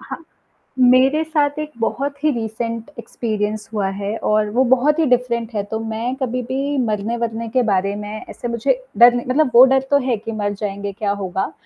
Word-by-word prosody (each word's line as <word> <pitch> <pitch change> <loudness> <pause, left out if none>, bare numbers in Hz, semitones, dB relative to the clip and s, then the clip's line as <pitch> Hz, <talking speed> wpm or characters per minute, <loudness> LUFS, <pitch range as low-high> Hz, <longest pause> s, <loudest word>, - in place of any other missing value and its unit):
हाँ। 330 - -9 0.6
मेरे 255 +4 +5
साथ 300 -2 0
एक 305 0 -4
बहुत 280 +5 -2
ही 305 - +4
रिसेंट 230 0 -4
एक्सपीरियंस 215 -2 -3
हुआ 205 -3 0
है 205 +2 -3
और 215 -1 +1
वो 250 +5 +2
बहुत 260 +5 +3
ही 320 - +3
डिफरेंट 240 -2 0
है, 205 - 0
तो 220 +2 -4
मैं 225 +3 -3
कभी 255 -2 -2
भी 275 +4 -2
मरने-वरने 230 0 -2
के 250 +3 +1
बारे 195 +1 +1
में 210 +1 -7
ऐसे 240 - -6
मुझे 235 - 0 0.2
डर 240 +1 +8
नहीं 245 0 -3
मतलब 270 +2 +2
वो 245 +2 +10
डर 265 - +4
तो 285 - +5
है 245 -3 +1
कि 225 +2 -7
मर 205 -2 -2
जाएँगे 200 -1 -4
क्या 205 0 -2
होगा 190 +1 -3
235 Hz, 195 wpm, -20 LUFS, 215-260 Hz, 0.6 s, वो